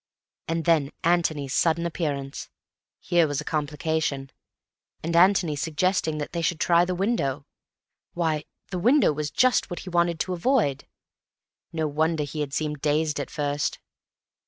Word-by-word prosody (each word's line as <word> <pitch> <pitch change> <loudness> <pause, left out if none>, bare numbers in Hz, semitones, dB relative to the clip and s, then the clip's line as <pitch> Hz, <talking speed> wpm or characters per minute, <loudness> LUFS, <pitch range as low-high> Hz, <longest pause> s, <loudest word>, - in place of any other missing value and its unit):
And 165 -1 -2
then 155 -5 +3
Antony's 160 -5 +1
sudden 170 0 +2
appearance! 145 -5 -3 0.5
Here 170 -2 +2
was 145 -1 -2
a - - -4
complication. 150 -2 -2 0.7
And 165 +1 -2
Antony 180 -3 +4
suggesting 160 +2 0
that 150 - -4
they 170 - -1
should 165 0 0
try 170 0 +4
the 180 0 -2
window! 160 - -1 0.7
Why, 160 -3 0 0.3
the 180 - -2
window 245 - +4
was 150 0 -3
just 255 +7 +2
what 175 - -5
he 185 - -8
wanted 170 -1 +1
to 185 - -2
avoid. 175 - +1 0.8
No 160 -1 -1
wonder 155 +1 0
he 145 +2 -6
had 145 -2 -2
seemed 150 -1 -2
dazed 150 0 +1
at 140 - -4
first. 145 -1 -1
160 Hz, 150 wpm, -25 LUFS, 145-175 Hz, 0.8 s, Antony